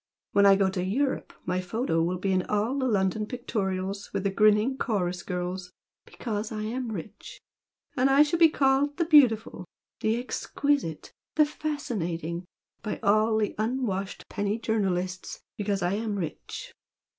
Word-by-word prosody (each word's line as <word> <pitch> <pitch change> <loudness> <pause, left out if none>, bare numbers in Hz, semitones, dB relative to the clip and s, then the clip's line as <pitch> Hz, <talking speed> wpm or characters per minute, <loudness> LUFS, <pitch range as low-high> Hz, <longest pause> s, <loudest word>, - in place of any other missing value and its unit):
When 200 0 +5
I 195 - +8
go 195 0 +3
to 190 -1 -2
Europe 260 +9 -1
my 180 +1 0
photo 185 -2 0
will 175 +2 0
be 195 +2 -1
in 185 -1 +3
all 220 +7 0
the 260 - +1
London 205 -1 +1
pictorials 200 -5 -3
with 190 - -2
the 200 - +1
grinning 215 +5 +4
chorus 180 -6 -1
girls, 180 +1 -4 0.3
because 215 -2 -4
I 215 -1 -3
am 235 +2 -3
rich! 205 0 -8 0.6
And 260 +1 +3
I 275 +2 +7
shall 330 +3 -1
be 330 -1 +8
called 280 0 +2
'the 340 - +1
beautiful,' 235 - +4 0.3
'the 220 +1 +1
exquisite' 255 - -2 0.2
'the 305 - +6
fascinating' 185 - -3 0.4
by 215 - -4
all 215 +2 +3
the 215 -1 0
unwashed 215 -5 -2
penny 205 +1 -1
journalists 185 -5 -2 0.2
because 200 -2 -1
I 175 +2 +1
am 215 0 -2
rich! 175 -6 -6
210 Hz, 155 wpm, -27 LUFS, 185-250 Hz, 0.6 s, I